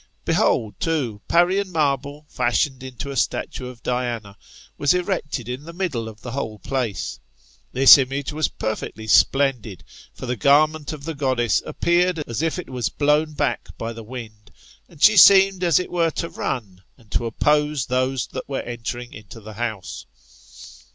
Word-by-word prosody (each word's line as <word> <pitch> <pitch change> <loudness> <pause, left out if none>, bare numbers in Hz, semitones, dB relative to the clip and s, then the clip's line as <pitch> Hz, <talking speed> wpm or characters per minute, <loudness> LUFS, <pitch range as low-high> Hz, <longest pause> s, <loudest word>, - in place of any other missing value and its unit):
Behold, 105 -3 +1
too, 135 -11 -2
Parian 185 +3 +2
marble 145 -2 -1
fashioned 130 +2 0
into 130 +1 -7
a - - -6
statue 125 0 -2
of 125 -1 -12
Diana, 120 -5 -3 0.4
was 145 +5 +2
erected 175 - -2
in 125 +3 -5
the 170 - -9
middle 155 -12 -3
of 110 +1 -14
the 125 - -7
whole 115 -5 -4
place. 120 - -3 0.5
This 135 +2 +8
image 135 +2 -2
was 155 -1 +1
perfectly 110 0 -5
splendid; 115 -6 +2 0.3
for - - -9
the 125 0 -2
garment 150 +2 +3
of 150 -3 -8
the 165 +2 -4
goddess 130 -5 +1
appeared 175 +1 +1
as 115 +4 -3
if 165 +1 -1
it 180 - -7
was 125 -3 -2
blown 150 +1 +1
back 145 -1 -2
by 115 +1 -4
the 115 - -9
wind, 110 -2 -10 0.4
and 160 -5 -8
she 215 -1 +7
seemed, 195 0 +7
as 170 -2 +4
it 180 - -2
were, 170 -2 +2
to 165 +1 -4
run 95 -7 -5 0.2
and 115 -4 -23
to - - +1
•ppose 150 +4 +1
those 130 -1 0
that 130 - -7
were 135 - -2
entering 120 +1 -6
into 105 +2 -11
the 110 0 -11
house. 110 -3 -5
130 Hz, 165 wpm, -22 LUFS, 115-155 Hz, 0.5 s, This